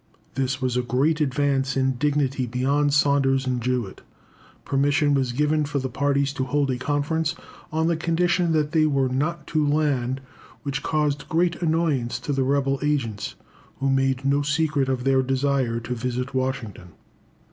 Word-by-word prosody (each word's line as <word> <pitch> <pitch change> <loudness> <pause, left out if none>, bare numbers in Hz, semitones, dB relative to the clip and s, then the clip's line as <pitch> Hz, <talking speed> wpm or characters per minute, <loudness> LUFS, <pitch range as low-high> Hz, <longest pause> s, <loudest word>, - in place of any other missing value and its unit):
This 135 0 -1
was 130 -2 -1
a 125 - +2
great 140 +6 +1
advance 135 -1 +1
in 135 0 +2
dignity 135 -1 0
beyond 140 +4 +1
Saunders 140 -2 +3
and 125 -1 -1
Jewett. 125 -4 -2 0.6
Permission 145 +1 +2
was 130 -3 +1
given 150 +4 +1
for 145 0 -2
the 130 -2 -2
parties 140 +1 +1
to 135 - -2
hold 140 +1 0
a 125 - -2
conference 150 +4 -1 0.4
on 160 +1 0
the 170 0 +2
condition 175 +1 +1
that 150 -2 +1
they 155 -2 +3
were 135 -3 +1
not 150 +5 -2
to 155 -1 0
land, 145 -4 +1 0.4
which 140 0 -3
caused 150 -2 -1
great 170 +2 +1
annoyance 155 -7 0
to 145 - -2
the 135 - 0
rebel 135 0 +1
agents, 135 -9 -1 0.4
who 135 0 +1
made 135 0 +1
no 140 +1 +3
secret 150 -2 0
of 130 -2 -1
their 135 0 +3
desire 130 -2 0
to 120 +2 -4
visit 125 +2 -3
Washington. 130 -9 -3
140 Hz, 165 wpm, -24 LUFS, 130-150 Hz, 0.6 s, Saunders